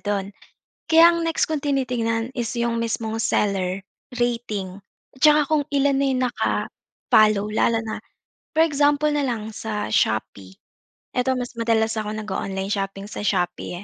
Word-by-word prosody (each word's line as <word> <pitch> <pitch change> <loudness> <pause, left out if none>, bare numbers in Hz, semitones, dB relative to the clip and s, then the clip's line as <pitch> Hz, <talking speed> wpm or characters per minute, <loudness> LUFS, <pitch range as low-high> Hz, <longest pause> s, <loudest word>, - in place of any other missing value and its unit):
do'n. 200 -1 -2 0.5
Kaya 330 +1 +7
ang 335 -1 -1
next 325 -1 0
kung 310 - 0
tinitingnan 250 -5 -1
is 240 -2 -4
'yung 235 -1 0
mismong 225 -1 -2
seller, 195 -3 0 0.4
rating, 215 -6 -2 0.4
at - - -27
saka 300 0 +7
kung 300 -2 +2
ilan 275 0 +3
na 280 - +2
'yung 260 -1 0
naka-follow, 215 -3 +1
lalo 225 +1 +2
na 220 -1 -5 0.5
for 320 +1 +4
example 290 0 +2
na 295 -1 0
lang, 220 -4 -3
sa 215 -2 -3
Shopee, 110 -3 -1 0.6
eto 250 +1 +1
mas 245 0 -5
madalas 225 -1 +1
ako 210 0 -3
nag-o-online 195 -2 -4
shopping 195 -1 -3
sa 210 - -6
Shopee, 175 -2 -1
225 Hz, 145 wpm, -23 LUFS, 205-270 Hz, 0.6 s, Kaya